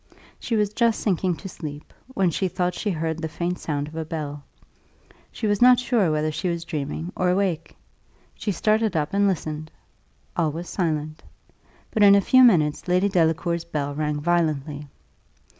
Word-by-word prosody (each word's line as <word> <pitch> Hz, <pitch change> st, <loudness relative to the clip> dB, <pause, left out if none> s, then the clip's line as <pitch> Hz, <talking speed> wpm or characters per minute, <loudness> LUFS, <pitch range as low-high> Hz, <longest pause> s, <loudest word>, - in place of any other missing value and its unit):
She 235 Hz, -, -2 dB
was 210 Hz, -1 st, +1 dB
just 230 Hz, 0 st, +2 dB
sinking 185 Hz, -3 st, 0 dB
to 195 Hz, -, -9 dB
sleep, 150 Hz, -5 st, -8 dB
when 195 Hz, -9 st, 0 dB
she 190 Hz, +4 st, 0 dB
thought 180 Hz, 0 st, -1 dB
she 210 Hz, -, -3 dB
heard 160 Hz, -2 st, -2 dB
the 160 Hz, -, -2 dB
faint 175 Hz, +3 st, -3 dB
sound 145 Hz, -2 st, -3 dB
of 155 Hz, -, -11 dB
a 160 Hz, -, -2 dB
bell. 150 Hz, -2 st, -5 dB, 0.9 s
She -, -, -5 dB
was 205 Hz, 0 st, +1 dB
not 250 Hz, 0 st, +7 dB
sure 230 Hz, -9 st, +1 dB
whether 155 Hz, 0 st, 0 dB
she 180 Hz, +4 st, -2 dB
was 170 Hz, -1 st, -3 dB
dreaming 155 Hz, +2 st, -4 dB
or 185 Hz, -, +1 dB
awake. 180 Hz, -3 st, -1 dB, 0.6 s
She 210 Hz, -, -3 dB
started 215 Hz, +1 st, +1 dB
up 150 Hz, +2 st, -1 dB
and 200 Hz, 0 st, +3 dB
listened. 155 Hz, -4 st, -3 dB, 0.7 s
All 165 Hz, -3 st, +1 dB
was 170 Hz, +3 st, -6 dB
silent. 155 Hz, -4 st, -2 dB, 0.7 s
But 220 Hz, -, 0 dB
in 200 Hz, -1 st, +8 dB
a -, -, +6 dB
few 255 Hz, +6 st, +5 dB
minutes 160 Hz, -9 st, +3 dB
Lady 180 Hz, +3 st, +2 dB
Delacour's 170 Hz, -1 st, +1 dB
bell 145 Hz, -4 st, -3 dB
rang 150 Hz, 0 st, -2 dB
violently. 150 Hz, -3 st, -1 dB
170 Hz, 175 wpm, -24 LUFS, 155-195 Hz, 0.9 s, in